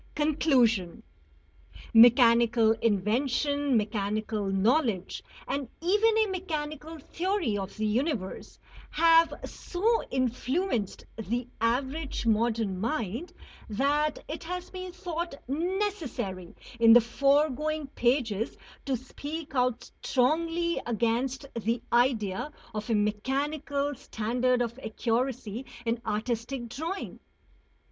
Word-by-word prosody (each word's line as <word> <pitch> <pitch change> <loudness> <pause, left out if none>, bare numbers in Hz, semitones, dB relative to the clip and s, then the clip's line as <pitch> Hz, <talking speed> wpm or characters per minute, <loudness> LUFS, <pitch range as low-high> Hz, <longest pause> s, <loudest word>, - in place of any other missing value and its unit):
XXI 295 - -3
CONCLUSION 245 - +2 0.9
Mechanical 235 -1 +6
invention, 245 +6 +1
mechanical 210 0 -1
knowledge, 205 - +1 0.3
and 275 -2 -2
even 420 +6 +3
a 440 - +4
mechanical 320 -5 -4
theory 345 - -1
of 195 -1 -5
the 215 - -1
universe, 220 - -2 0.3
have 330 0 +5
so 445 +6 0
influenced 255 - -1
the 235 +3 -3
average 265 +4 -1
modern 220 -3 +1
mind, 230 - -2 0.4
that 290 +7 +1
it 320 +4 -6
has 360 +2 -5
been 370 -1 -6
thought 345 -3 -4
necessary 300 - -3 0.2
in 230 -1 +8
the 240 - +9
foregoing 290 +5 +1
pages 240 -5 0 0.3
to 265 -2 +1
speak 290 +5 -7
out 250 -2 0
strongly 330 +6 +1
against 240 +4 0
the 230 +1 -1
idea 240 0 +1 0.2
of 215 +1 -5
a 225 - +3
mechanical 280 +7 -1
standard 245 +1 0
of 235 +2 -5
accuracy 235 -1 -2 0.2
in 230 0 -1
artistic 235 +3 -2
drawing. 325 - -5
255 Hz, 100 wpm, -28 LUFS, 225-310 Hz, 0.9 s, the